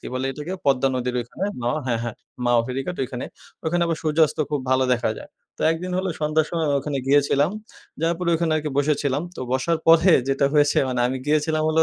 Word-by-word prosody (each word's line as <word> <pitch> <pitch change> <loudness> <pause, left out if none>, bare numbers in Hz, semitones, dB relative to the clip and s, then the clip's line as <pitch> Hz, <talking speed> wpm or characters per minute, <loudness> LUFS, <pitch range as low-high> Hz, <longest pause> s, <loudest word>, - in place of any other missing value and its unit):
কি - - -9
বলে 130 +1 -1
এটাকে 150 +6 -6
পদ্মা 135 -1 +3
নদীর 125 0 -2
ওইখানে 120 +10 -5 0.2
মাওয়া 125 +6 0
হ্যাঁ, 115 -2 0
হ্যাঁ 120 -2 -4 0.3
মাওয়া 120 -1 +4
ফেরঘাট 135 +8 -4
ওইখানে। 125 -1 -4 0.4
ওইখানে 170 +2 +1
আবার 165 -1 -1
সূর্যাস্ত 155 0 +2
খুব 145 -2 0
ভালো 130 0 +3
দেখা 120 -2 -1
যায়। - - -11 0.3
তো - - -17
একদিন, 180 +3 -5
হলো 190 - -1
সন্ধ্যার 155 +1 +1
সময় 165 -2 -1
আমি 140 - +2
ওখানে 140 -1 -3
গিয়েছিলাম, 145 +2 +3 0.5
যাওয়ার 165 +1 +1
পরে 180 -1 -2
ওইখানে 165 -1 0
আরকি 150 -1 -2
বসেছিলাম। 145 -1 +1
তো - - -7
বসার 160 +5 +1
পরে 165 +3 +6 0.2
যেটা 135 0 +2
হয়েছে 145 -1 +3
মানি 125 -1 -1
আমি 130 +1 -2
গিয়েছিলাম 155 +1 +1
হলো 160 +1 +4
150 Hz, 210 wpm, -23 LUFS, 130-160 Hz, 0.5 s, পরে